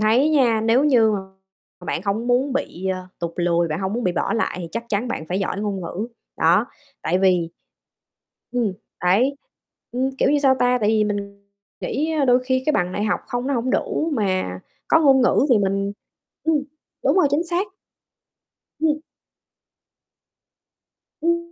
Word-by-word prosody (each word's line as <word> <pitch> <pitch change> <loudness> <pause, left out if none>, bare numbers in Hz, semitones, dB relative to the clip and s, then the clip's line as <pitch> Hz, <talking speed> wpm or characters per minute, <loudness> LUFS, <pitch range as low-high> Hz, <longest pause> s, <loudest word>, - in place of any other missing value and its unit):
thấy 230 +7 +4
nha, 245 -7 +3
nếu 230 +5 +3
như 240 -7 +5 0.7
mà 180 - -11
bạn - - -1
hông 210 +4 -1
muốn 255 +3 +2
bị, 190 -9 -3
ơ, 185 -1 -3
tụt 170 -1 -3
lùi, 170 -1 +1
bạn 155 +3 -3
hông 190 0 -2
muốn 240 +2 -2
bị 180 - +1
bỏ - - -1
lại 225 -5 -1
thì 170 - -6
chắc 230 +1 -3
chắn 215 +3 -1
bạn 200 -10 -3
phải 185 - -1
giỏi 195 0 -2
ngôn 205 -2 -2
ngữ, 180 +5 -4 0.3
đó. - - +3 0.4
Tại 180 - +1
vì 180 -3 +2 1.0
ừm, 235 -5 0 0.3
đấy, 235 +10 +3 0.6
ừm, 260 +2 0
kiểu - - +3
như, 295 - +3
sao 270 -2 +4
ta, 250 0 +3
tại 210 - +2
vì 215 -1 +3
mình 200 -1 -4 0.4
nghĩ, 310 +5 -1
ơ, - - +3
đôi 250 -1 +3
khi 260 0 +1
cái 305 - +3
bằng 180 -5 0
đại 205 - -1
học 210 - 0
hông 245 -1 -2
nó 280 - 0
hổng 245 +1 -1
đủ 320 +5 0
mà 185 - -1 0.3
có 320 - +5
ngôn 270 -4 +5
ngữ 250 - +3
thì 240 - +6
mình 195 0 0 0.5
ừm, 320 -1 +3 0.5
đúng - - +3
rồi, 370 - +5
chính 295 +5 +1
xác. 350 +4 -1 1.1
Ừm. 310 -1 +1 2.2
Ưm, 340 +1 +2
225 Hz, 180 wpm, -22 LUFS, 195-270 Hz, 2.2 s, thì